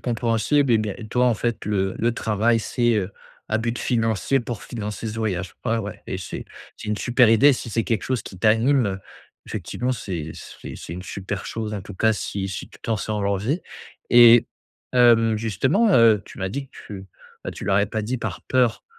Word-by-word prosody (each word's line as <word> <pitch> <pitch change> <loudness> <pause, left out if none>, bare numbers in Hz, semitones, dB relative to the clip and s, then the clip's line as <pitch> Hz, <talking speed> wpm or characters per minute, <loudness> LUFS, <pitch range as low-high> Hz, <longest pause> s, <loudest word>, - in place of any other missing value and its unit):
compréhensible 120 +3 +1
et 110 - +5
bien 105 -2 -2
et 110 - -9
toi 125 +3 +2
en 120 - +3
fait 120 0 -2
le 95 -2 0
le 120 +1 +1
travail 115 +1 +1
c'est, 120 +1 +1
heu, 100 -1 -1 0.4
à 110 - +1
but 115 +1 -2
financier 115 +2 +1
pour 120 -2 -6
financer 105 -1 -5
ce 110 - -4
voyage. 95 -5 -2
Ouais, 115 +1 +1
ouais, 105 -2 -6
et 95 - -3
c'est 90 - -6 0.3
c'est - - -8
une 105 - 0
super 120 0 +3
idée 135 +6 +6
si 120 -2 -5
c'est 115 +1 0
quelque 110 -5 -1
chose 130 -5 -1
qui 95 - -10
t'anime, 115 +5 +3
heu, 95 -1 -3 0.5
effectivement, 125 +1 -3
c'est 85 -9 -5
c'est - - -10
c'est 80 - -8
une 90 - -7
super 100 +2 -5
chose. 110 -1 -4
En 100 - -4
tout - - -10
cas, 110 +4 +3
si 100 -1 -3
si 95 - -6
tu - - -17
t'en 110 -1 -1
sens 105 0 -3
l'envie 100 - 0 0.5
et 120 -1 +8 0.5
hem, 115 -3 +5
justement, 130 - +2
heu, 110 -4 +6
tu - - -13
m'as 95 0 -2
dit 135 +7 -5
que - - -46
tu, 95 -2 -9 0.4
ben, - - -3
tu - - -8
leur 100 -1 +2
avais 100 0 +3
pas 110 +1 -3
dit 125 +4 -2
par 110 -6 -5
peur, 125 -3 +1
110 Hz, 210 wpm, -23 LUFS, 100-120 Hz, 0.5 s, et